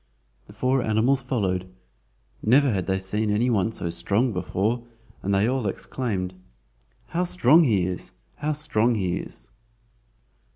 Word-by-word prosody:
The - - -13
four 130 +1 +1
animals 120 +5 +2
followed. 95 -8 -1 0.7
Never 135 +4 +4
had 95 -4 -1
they 95 0 +1
seen 105 +3 -1
any 115 +4 +2
one 105 -1 +2
so 85 -6 -3
strong 110 +7 +1
before, 105 +6 -1 0.4
and 100 - -2
they 100 +2 +3
all 130 -3 0
exclaimed: 95 -3 -3 0.8
"How 175 +2 0
strong 165 -2 +5
he 100 -8 +2
is! 90 -1 -3 0.3
how 150 +1 -1
strong 125 -6 +1
he 95 -4 0
is!" - - -8
110 Hz, 140 wpm, -25 LUFS, 95-130 Hz, 0.8 s, strong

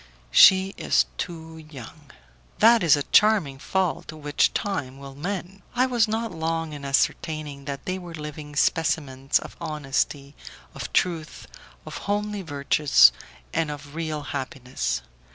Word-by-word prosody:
"She 190 0 +7
is - - +3
too 160 -2 -6
young." 145 +1 -12 0.5
"That 230 +1 +6
is 165 -4 +5
a 145 - -2
charming 195 -11 +3
fault 185 +1 -1
which 150 -2 +1
time 145 -10 -3
will 140 0 -10
mend." 185 +5 -5
I 250 +1 +3
was 240 -3 +2
not 225 0 -2
long 165 -1 -3
in 145 -1 -8
ascertaining 140 +1 -1
that 140 0 -6
they 185 +1 -2
were 175 -2 -9
living 150 -1 -8
specimens 145 -4 +1
of - - -8
honesty, 145 -2 -2 0.4
of - - -7
truth, 165 -3 -1 0.4
of - - -7
homely 205 0 -1
virtues, 140 - +4 0.4
and 160 -2 0
of 145 -1 -8
real 155 -2 -3
happiness. 125 - -4
155 Hz, 135 wpm, -25 LUFS, 140-180 Hz, 0.5 s, She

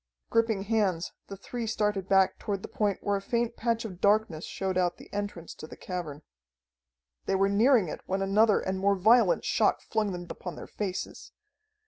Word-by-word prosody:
Gripping 225 -3 +2
hands, 200 -5 0 0.2
the 195 - -8
three 230 +4 -5
started 210 -3 -1
back 195 -1 +3
toward 200 -2 -3
the - - -5
point 205 -3 -1
where 205 0 +1
a - - -6
faint 235 +2 -1
patch 230 0 -1
of 185 -4 -8
darkness 205 -6 +2
showed 190 -1 -3
out 180 -1 +1
the - - -15
entrance 205 -5 -5
to 155 - -10
the - - -11
cavern. 160 -5 -6 1.0
They 195 - +1
were 195 +1 +3
nearing 220 0 +4
it - - -6
when 190 +1 -1
another 210 +2 +4
and 190 0 -2
more 200 +1 +3
violent 230 - +4
shock - - +2
flung 215 -2 -1
them 175 -1 -6
upon 180 0 -7
their - - -8
faces. 195 -3 -5
200 Hz, 185 wpm, -28 LUFS, 185-220 Hz, 1.0 s, nearing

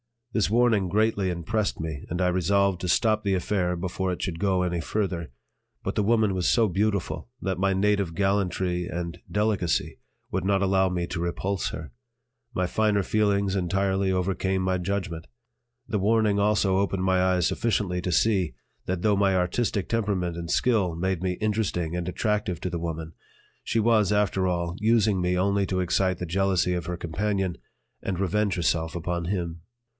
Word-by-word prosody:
This 110 -6 +2
warning 115 -4 +3
greatly 105 0 +1
impressed 100 +5 -1
me 80 -3 -5
and 85 +2 -2
I 90 - +3
resolved 95 +1 +2
to 90 - -2
stop 110 +4 +2
the 100 -2 +1
affair 90 -1 0
before 90 +1 -2
it 90 - -6
should 85 -4 -3
go 95 -1 +2
any 90 -1 -1
further; 90 -3 -2 0.5
but - - -2
the - - +2
woman 110 -1 +2
was 90 -2 0
so 115 -2 +4
beautiful 100 -3 -1
that 95 -2 -2
my 95 0 +2
native 100 -3 +1
gallantry 95 -3 0
and 85 0 -5
delicacy 105 -4 0 0.3
would 95 0 -1
not 100 0 +2
allow 95 0 +3
me 90 -1 -1
to 85 - -5
repulse 90 +2 -2
her; 80 -5 -7 0.6
my 90 - +1
finer 105 +1 +1
feelings 100 -2 +1
entirely 95 +1 +1
overcame 95 0 0
my 95 0 +1
judgment. 90 -3 -3 0.6
The 105 - -1
warning 105 0 +2
also 100 -2 +2
opened 95 -1 0
my 95 -1 +3
eyes 90 -2 +2
sufficiently 100 -6 0
to 90 - -2
see 95 - +2 0.3
that 90 -1 -2
though 105 0 +3
my 100 -1 +3
artistic 95 +3 0
temperament 100 -7 -1
and 85 -1 -5
skill 105 -9 +2
made 95 +1 -1
me 90 -1 0
interesting 100 -5 -1
and 90 -1 -3
attractive 105 -1 -1
to 90 - -2
the 85 - -2
woman, 80 -1 -5 0.5
she 115 - 0
was, 110 -3 +3
after 100 -2 +1
all, 85 -1 -1
using 110 -3 +3
me 90 0 +1
only 100 +1 +2
to 95 -1 0
excite 90 0 +1
the 90 - -3
jealousy 90 0 +1
of 90 -2 -3
her 90 +1 -3
companion 95 +2 -1 0.4
and 95 -2 -3
revenge 100 +1 +1
herself 80 0 0
upon 85 0 -2
him. 85 -3 -3
95 Hz, 175 wpm, -26 LUFS, 90-100 Hz, 0.6 s, so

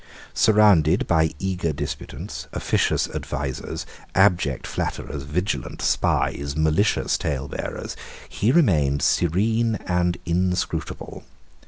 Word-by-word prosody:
Surrounded 100 -6 +4
by 80 -1 +3
eager 90 -2 -1
disputants, 70 - -6
officious - - +1
advisers, - - -4 0.3
abject 90 -8 +3
flatterers, 70 0 -4
vigilant 90 +9 -3
spies, 70 0 0
malicious 80 +7 +2
talebearers, 70 -1 -4 0.3
he 110 +4 +1
remained 75 - +3
serene 110 +7 +2
and 90 -1 +1
inscrutable. 90 +1 -2
90 Hz, 85 wpm, -23 LUFS, 75-100 Hz, 0.3 s, Surrounded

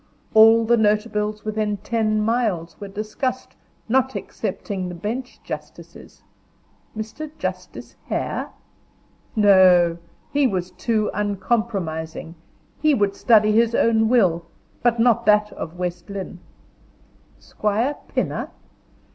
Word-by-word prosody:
All 225 +1 +7
the 235 +1 +3
notables 210 0 0
within 215 -1 -1
ten 215 0 0
miles 210 -7 -1
were 200 - -7
discussed, 215 +6 -4 0.3
not 265 +2 +1
excepting 190 -4 -4
the 180 - -7
bench 230 +8 -5
justices. - - -10 0.7
Mr. 220 +8 -6
Justice - - -6
Hare? - - -3 0.9
No! 185 -5 +5 0.3
he 285 -1 +3
was 185 -4 -3
too 215 +3 -1
uncompromising, 195 -6 -2 0.5
he 305 -1 +4
would 200 -3 +1
study 215 -3 +4
his 230 +2 +3
own 220 -1 +3
will, 185 -9 +3 0.4
but 240 -1 +2
not 230 -2 +3
that 210 0 +4
of 165 +2 -7
West 180 +2 -4
Lynne. 195 -2 -6 1.0
Squire 220 +7 -1
Pinner? - - -2
215 Hz, 110 wpm, -22 LUFS, 195-230 Hz, 1.0 s, All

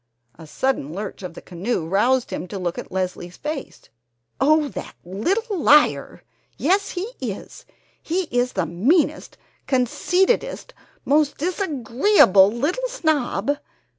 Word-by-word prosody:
A 160 - -13
sudden 205 - -1
lurch 200 +4 -6
of 180 -3 -7
the - - -10
canoe 180 0 -3
roused 235 +8 +1
him - - -4
to 195 - -6
look 175 -2 -3
at - - -9
Leslie's 180 -1 -4
face: 300 -2 -6 0.6
"Oh, 305 +2 +4
that - - -8
little 380 - -1
liar! 300 0 +3 0.3
Yes, 385 +7 +1
he 400 +7 -3
is! - - -7 0.3
He 360 +4 -1
is 245 +1 +1
the - - 0
meanest, 230 - +1 0.3
conceitedest, 360 - 0 0.3
most 290 0 +2
disagreeable 285 - +3
little 315 - -1
snob 290 - 0
270 Hz, 125 wpm, -22 LUFS, -, 0.6 s, Oh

